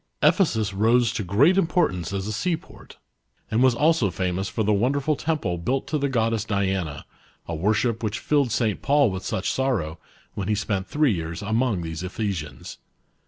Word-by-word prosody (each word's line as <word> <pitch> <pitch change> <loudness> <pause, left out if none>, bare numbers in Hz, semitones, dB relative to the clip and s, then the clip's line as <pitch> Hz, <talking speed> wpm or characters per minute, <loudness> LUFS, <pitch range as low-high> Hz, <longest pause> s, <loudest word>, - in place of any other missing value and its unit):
Ephesus 110 - +3
rose 115 +3 +3
to 110 - -2
great 140 - +4
importance 155 - 0
as 100 -1 -3
a 105 - -3
seaport, 165 - -4 0.5
and 110 +2 +2
was 130 -2 +4
also 150 -6 +3
famous 90 +2 -2
for 110 +4 -1
the 105 +1 +2
wonderful 135 +8 +1
temple 140 - -2
built 130 +10 -1
to 150 - -1
the 140 0 0
goddess 115 -4 0
Diana, 95 -8 -2 0.4
a 85 - -4
worship 110 +7 0
which 110 -1 -2
filled 140 -5 +1
St 110 -2 0
Paul 140 -5 +3
with 95 0 -5
such 95 - -1
sorrow, 100 -13 -1 0.3
when 95 -2 -4
he 105 - +1
spent 100 -2 -2
three 150 -5 +2
years 85 +1 -4
among 110 -3 0
these 80 0 -5
Ephesians. 90 - -4
110 Hz, 170 wpm, -24 LUFS, 95-130 Hz, 0.5 s, great